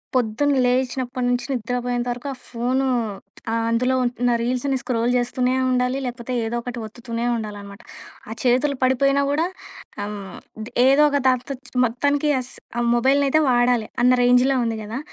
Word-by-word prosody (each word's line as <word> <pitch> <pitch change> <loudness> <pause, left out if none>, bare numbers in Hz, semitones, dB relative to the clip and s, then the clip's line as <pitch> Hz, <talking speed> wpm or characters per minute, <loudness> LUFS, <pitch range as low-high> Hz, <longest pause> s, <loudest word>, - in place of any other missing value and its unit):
పొద్దున 250 +4 +1
లేచినప్పటి 250 0 -1
నుంచి 245 0 0
నిద్రపోయేంత 245 0 -2
వరకు 245 +4 -9
ఆ - - -10
ఫోను 255 +3 0 0.6
ఆహ్, 230 0 0
అందులో 250 +3 +1
ఉన్న 245 0 0
రీల్స్‌‌ని 255 +3 0
స్క్రోల్ 235 -1 -1
జేస్తూనే 250 +1 0 0.2
ఉండాలి. 250 +1 +1
లేపోతే 245 0 -5
ఏదో 225 +1 -3
ఒకటి 245 0 -6
ఒత్తుతూనే 230 +1 -5
ఉండాలనమాట. 205 -2 -7 0.5
ఆ - - -7
చేతులు 260 +3 +2
పడిపోయినా 275 +2 +3
గూడా 305 +4 +1 0.6
ఆహ్, 210 - -4
హ్మ్. 195 -2 -9 0.5
ఏదోక 285 +1 +5
దాంతో 255 +2 0 0.3
మొత్తానికి 285 +5 0
అస్స 255 - -9 0.3
ఆ - - +1
మొబైల్ 265 +4 +3
అయితే 310 +3 +3
వాడాలి. 245 -2 +2 0.2
అన్న 250 +1 +6
రేంజ్‌లో 250 +2 +4
ఉంది 225 -1 -2
గదా! 225 +5 -5
245 Hz, 145 wpm, -22 LUFS, 235-260 Hz, 0.6 s, అన్న